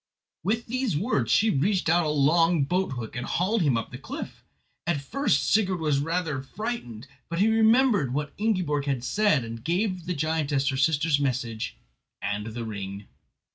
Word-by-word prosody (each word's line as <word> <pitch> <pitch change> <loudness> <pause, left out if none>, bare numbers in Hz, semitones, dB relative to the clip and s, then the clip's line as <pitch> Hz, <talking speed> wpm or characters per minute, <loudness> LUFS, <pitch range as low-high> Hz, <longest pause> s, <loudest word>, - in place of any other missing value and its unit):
With 225 +6 0
these 250 - -1
words 150 - 0
she 220 0 +4
reached 180 +7 +1
out 165 0 +3
a - - 0
long 160 +2 +3
boat 180 +2 0
hook 120 -4 -6
and 120 - -3
hauled 195 - 0
him 140 -7 +3
up 115 - -4
the - - -8
cliff. - - -7 0.4
At 170 -4 +1
first 275 - 0
Sigurd 190 -4 +2
was 150 -3 +1
rather 160 -2 -1
frightened, 135 - -5 0.2
but 170 - -3
he 200 +5 +4
remembered 225 - +4
what 145 +2 -3
Ingiborg 180 -10 0
had 135 -4 -1
said, 205 - +2
and 115 0 -7
gave 180 - -1
the 180 - -1
giantess 150 -3 0
her 135 - -1
sister's 150 +2 +2
message 120 -5 -2 0.4
and 105 +2 -3
the 115 +1 -5
ring. 100 -1 -6
155 Hz, 175 wpm, -26 LUFS, 130-190 Hz, 0.4 s, she